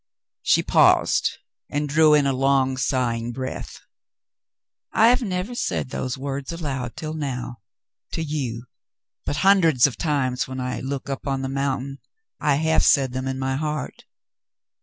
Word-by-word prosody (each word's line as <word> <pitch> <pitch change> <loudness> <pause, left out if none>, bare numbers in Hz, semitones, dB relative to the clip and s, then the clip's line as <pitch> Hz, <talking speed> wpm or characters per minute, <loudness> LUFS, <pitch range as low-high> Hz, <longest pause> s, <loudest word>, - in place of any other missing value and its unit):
She - - +3
paused - - +4 0.4
and 145 +1 -1
drew 155 +1 +5
in 145 -2 +3
a 135 - +2
long, 135 0 +2
sighing 120 -3 -1
breath. 130 +1 -6 1.1
"I 225 +2 +5
have 250 +2 +3
never 190 +1 -3
said 185 - -2
those 130 -1 -3
words 135 +1 -4
aloud 140 -7 -4
until 155 -1 -5
now, 130 -5 -4 0.6
to 165 - -2
you, 135 -7 -3 0.6
but - - -1
hundreds 165 -10 +5
of 135 - -1
times 140 -6 0
when 130 0 -6
I 125 0 -3
look 135 +1 -4
up 135 0 -5
on 135 -1 -1
the 130 - -2
mountain 135 0 -2 0.4
I 145 -2 +2
have 160 +2 +2
said 135 -3 +4
them 130 0 -3
in 130 0 -2
my 130 0 -1
heart. 150 -2 -4
135 Hz, 155 wpm, -23 LUFS, 130-150 Hz, 1.1 s, drew